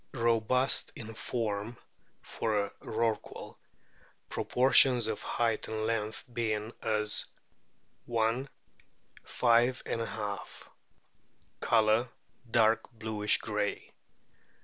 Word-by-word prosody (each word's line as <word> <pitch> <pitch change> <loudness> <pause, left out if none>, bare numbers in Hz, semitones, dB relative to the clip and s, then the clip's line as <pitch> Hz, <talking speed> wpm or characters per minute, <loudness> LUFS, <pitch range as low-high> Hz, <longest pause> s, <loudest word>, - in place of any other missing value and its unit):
Robust 120 +2 +2
in 115 -1 -8
form 110 0 -3 0.5
(for 110 -2 -2
a 100 - -6
Rorqual), 115 0 -3 0.8
proportions 125 -1 +4
of 110 -1 -2
height 115 -2 -1
and 110 0 -3
length 110 -1 -2
being 110 -1 -2
as 105 -1 +1 0.8
i: 115 +3 +1 0.8
5^. 115 -3 0 0.9
Colour 110 +1 +3 0.4
dark 115 0 +3
bluish 110 -2 0
grey. - - -3
115 Hz, 80 wpm, -30 LUFS, 110-120 Hz, 0.9 s, proportions